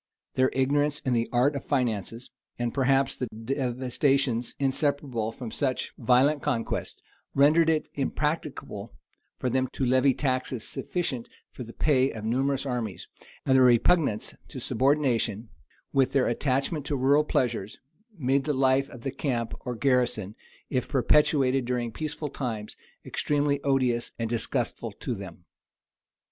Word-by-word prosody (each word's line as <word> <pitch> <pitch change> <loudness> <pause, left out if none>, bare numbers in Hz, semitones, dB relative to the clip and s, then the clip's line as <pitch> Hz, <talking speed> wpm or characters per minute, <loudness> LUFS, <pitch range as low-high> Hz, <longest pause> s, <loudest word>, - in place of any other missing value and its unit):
Their 130 0 +3
ignorance 145 +2 +2
in 130 - 0
the 115 -1 +1
art 130 +4 +3
of 140 - -4
finances, 115 -3 -2 0.3
and 120 -1 -2
perhaps 135 0 +2
the 125 - -3
devastations 125 +1 -1
inseparable 135 -4 0
from 115 -1 -7
such 130 +1 -1
violent 135 +4 +3
conquests, 125 -6 -2 0.3
rendered 155 +4 +5
it 155 -1 +1
impracticable 140 -7 -3 0.4
for - - -2
them 130 +1 +1
to 135 - -1
levy 130 +1 +4
taxes 130 -4 -1
sufficient 135 -9 -3 0.2
for - - -10
the 115 - -10
pay 135 0 +2
of 110 -4 -6
numerous 135 +4 0
armies; 120 -6 -3 0.4
and 130 - +4
their 130 - +6
repugnance 125 0 +3
to 130 - -7
subordination, 125 -4 +1 0.4
with 135 -2 +3
their 135 -2 +3
attachment 135 +5 0
to 145 - 0
rural 140 +3 +4
pleasures, 120 -8 -1 0.4
made 135 -1 +1
the 150 - +1
life 135 0 +2
of 120 -3 -11
the 135 - -2
camp 125 -4 -2
or 125 -2 -5
garrison, 120 -6 +1 0.4
if 130 - 0
perpetuated 135 0 +3
during 120 -1 -2
peaceful 150 +4 -4
times, 115 -6 -4 0.3
extremely 145 -1 0
odious 130 -4 +1
and 115 -1 -3
disgustful 120 -1 -2
to 125 - -4
them. 95 -5 -9
130 Hz, 140 wpm, -27 LUFS, 120-140 Hz, 0.4 s, their